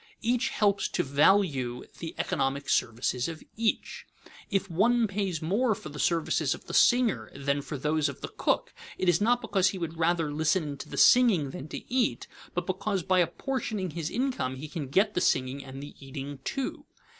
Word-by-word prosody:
Each 240 +1 +1
helps 200 -2 +1
to - - -1
value 140 -4 +2 0.2
the 165 -1 -6
economic 140 +1 -1
services 120 +2 0
of 165 -1 -7
each. 225 0 -1 0.4
If 195 -2 0
one 225 +7 +3
pays 195 -5 -2
more 215 +7 +2
for 155 - -9
the 150 0 -9
services 165 -2 +1
of - - -15
the - - -8
singer 230 - +3
than 140 +1 -1
for 140 +1 -6
those 150 +1 +1
of 140 - -9
the - - -4
cook, - - -1 0.2
it 185 - -1
is 175 +1 +4
not 240 +3 +3
because 195 -4 +2
he 190 - -5
would 165 -2 -5
rather 165 -2 +1
listen 155 0 0
to - - -9
the - - -6
singing 205 - +5
than 135 - -7
to - - -8
eat, 255 -3 +1 0.3
but 180 -1 -1
because 190 0 -1
by 185 0 +3
apportioning 200 - -1
his 165 -1 -3
income 245 - -1
he 140 +4 -7
can 150 -3 -5
get 200 +10 +2
the 180 - 0
singing 130 -3 +1
and 135 +1 -8
the 145 - -9
eating 135 +1 -7
too. 270 - -4
170 Hz, 190 wpm, -28 LUFS, 140-205 Hz, 0.4 s, singing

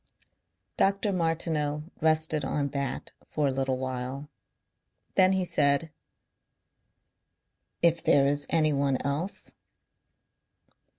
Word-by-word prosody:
Dr. 200 +1 +2
Martineau 160 -3 -1 0.2
rested 155 -1 +2
on 140 +1 -1
that 140 -1 -3 0.2
for 150 - -1
a 140 - +2
little 130 0 -1
while. 130 +2 -4 0.8
Then 185 0 +5
he 190 -1 0
said: 145 0 +2 1.9
"If 170 0 +4
there 140 -1 +4
is 145 0 +1
anyone 140 -4 +2
else?" 150 +8 -3
150 Hz, 95 wpm, -28 LUFS, 140-165 Hz, 1.9 s, Then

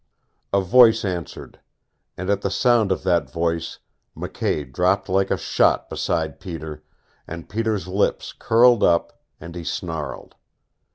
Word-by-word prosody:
A 100 - +3
voice 115 +3 +5
answered. 90 -4 -6 0.6
And 95 +2 -2
at 100 0 0
the 100 - -1
sound 115 0 +2
of 95 - -1
that 85 -7 +1
voice 85 0 -2 0.4
McKay 70 -4 -3
dropped 95 +5 +1
like 95 +1 +1
a - - +1
shot - - +1
beside 80 -3 -2
Peter, 80 -4 -7 0.4
and 85 0 -8
Peter's 110 -4 -2
lips 95 +2 -1
curled 120 0 +4
up, 85 -1 +1 0.2
and 85 +1 -9
he 85 -1 -7
snarled. 80 -3 -5
90 Hz, 135 wpm, -22 LUFS, 85-100 Hz, 0.6 s, voice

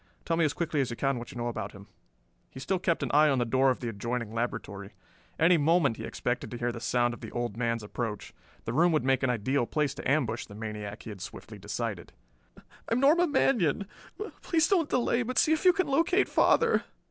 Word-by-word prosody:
Tell 165 - +1
me 165 - +2
as 145 - 0
quickly 165 -4 -1
as 130 - -1
you 120 - -4
can 135 0 0
what 120 - -8
you - - -10
know 120 0 -2
about 105 -4 -4
him." 100 0 -12 0.6
He 130 - -10
still 185 +8 -1
kept 170 -2 0
an - - -2
eye 150 +1 +6
on 135 - +2
the 120 - +1
door 130 +3 +3
of 130 - -1
the 120 - -3
adjoining 115 +1 -4
laboratory. 115 -4 -4 0.4
Any 170 +2 +5
moment 150 -5 +2
he - - -6
expected 120 0 -3
to 120 - -6
hear 120 0 -1
the 115 - -7
sound 120 +1 +1
of - - -10
the - - -7
old 120 -3 -3
man's 115 -1 -1
approach. 105 0 -5 0.3
The 115 - -3
room 170 +6 +4
would 155 - +2
make 135 0 +2
an 130 - +1
ideal 125 +2 0
place 150 -2 0
to - - -4
ambush 125 -6 0
the 100 - -12
maniac, 105 -1 -6
he 110 - -7
had 100 -3 -10
swiftly 105 +2 -9
decided. 105 -2 -5 0.4
"I - - -8
am 235 - +2
Norma 320 +6 +4
Manion. 200 - +2 0.6
Please 330 -1 +2
don't 345 -7 +2
delay, 245 -1 +1
but 245 +1 -4
see 315 - +4
if 315 - -2
you 365 - +9
can 370 0 0
locate 335 +7 +2
father." 465 -1 +3
130 Hz, 230 wpm, -29 LUFS, 115-175 Hz, 0.6 s, you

